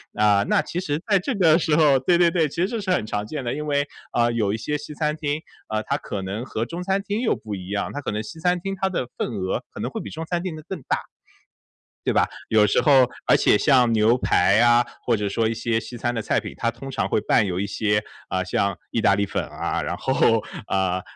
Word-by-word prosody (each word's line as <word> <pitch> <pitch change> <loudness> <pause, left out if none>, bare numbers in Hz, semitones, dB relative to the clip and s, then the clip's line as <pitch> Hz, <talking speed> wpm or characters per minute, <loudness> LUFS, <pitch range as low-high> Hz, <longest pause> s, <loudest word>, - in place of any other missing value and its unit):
啊， 105 -1 +4
那 - - +4
其 180 - -4
实 150 -4 -2
在 195 -3 +4
这 250 +6 -2
个 165 -4 +5
时 160 -3 +1
候 145 -4 +5
对 170 +6 +3
对 175 -1 +5
对， 165 -3 +1
其 - - -11
实 180 +3 +1
这 225 -1 -3
是 190 -2 -2
很 110 - +1
常 105 -1 -3
见 135 +2 -5
的。 120 - -1
因 150 +1 -4
为， 145 0 +1 0.2
呃， 120 0 +2
有 105 -4 +1
一 110 - -1
些 150 +7 -2
西 150 +1 -9
餐 150 0 -1
厅， 150 0 -2 0.3
呃， 110 0 -1
它 - - -1
可 100 - -5
能 100 +5 -4
和 115 -3 -3
中 170 +4 -6
餐 195 +1 0
厅 205 +3 -3
又 240 - +2
不 105 -2 -6
一 95 0 -8
样， 100 0 -2
它 145 - -4
可 105 - -3
能 105 +1 -2
西 160 +9 -9
餐 180 0 +2
厅 195 +2 -4
它 190 - +2
的 130 -9 -2
份 - - -1
额 95 -3 -2
可 - - -10
能 - - -2
会 - - -5
比 - - -7
中 160 +1 -6
餐 175 +1 -2
厅 180 -4 -3
的 155 - -10
更 190 -4 -5
大， - - 0 1.3
对 - - -16
吧？ - - -14
有 105 -1 +5
时 100 - +2
候 135 -4 +5 0.2
而 - - +6
且 105 - +4
像 125 -5 +4
牛 110 +2 +4
排 100 -4 +3
啊， 120 0 +5 0.2
或 120 - +2
者 105 -1 -2
说 110 +3 0
一 115 - +1
些 115 0 -1
西 120 +1 -7
餐 120 +1 -1
的 115 - -2
菜 - - +1
品 - - -8
它 115 - 0
通 135 +3 -9
常 - - -1
会 - - +1
伴 - - +3
有 90 -1 -2
一 100 - -1
些， 105 0 0 0.3
呃， 95 0 0
像 100 +1 -1
意 115 - -1
大 100 - +5
利 100 0 0
粉 - - -2
啊， - - -3
然 - - -3
后， - - +2 0.2
呃， 95 -1 0
125 Hz, 285 characters per minute, -23 LUFS, 105-160 Hz, 1.3 s, 而